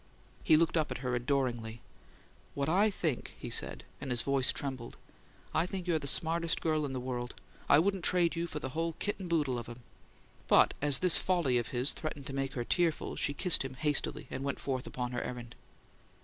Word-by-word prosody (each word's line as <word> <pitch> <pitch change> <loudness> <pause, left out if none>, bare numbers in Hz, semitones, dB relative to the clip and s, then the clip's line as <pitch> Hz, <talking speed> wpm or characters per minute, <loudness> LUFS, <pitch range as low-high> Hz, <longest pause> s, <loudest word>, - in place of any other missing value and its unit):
He 155 - +6
looked 165 +1 +2
up 155 - +1
at - - -3
her 125 - 0
adoringly. 120 -3 -1 0.8
"What 140 -1 -1
I 195 +7 +4
think," 160 - -3
he - - -7
said, - - -1 0.2
and 140 - -5
his 120 -3 +1
voice 135 -2 +2
trembled; 130 -4 -5 0.6
"I 165 +3 +2
think 185 -1 -4
you're 170 -3 +1
the 140 - -4
smartest 165 +3 +1
girl 155 -2 0
in 135 - -6
the 130 - -2
world! 125 -1 -4 0.3
I 145 - +8
wouldn't 190 +2 +1
trade 175 -1 +3
you 170 +1 -2
for 155 - -6
the 140 -3 -4
whole 165 +4 -2
kit 205 +5 -3
and 185 -3 -6
boodle 145 -7 +1
of 120 - -8
'em!" 120 +1 -9 0.7
But - - +6
as 145 -1 +6
this 180 - +6
folly 165 -10 +2
of 120 - -3
his 125 +2 0
threatened 150 -3 -5
to 140 - -6
make 135 -1 -2
her 120 -2 -3
tearful, 170 0 0
she 145 - 0
kissed 180 0 +2
him 130 -1 -6
hastily, 150 +1 0
and 130 - -4
went 140 -1 -2
forth 130 -2 -3
upon 125 -1 -4
her 120 - -2
errand. 120 -1 -6
140 Hz, 210 wpm, -32 LUFS, 125-165 Hz, 0.8 s, I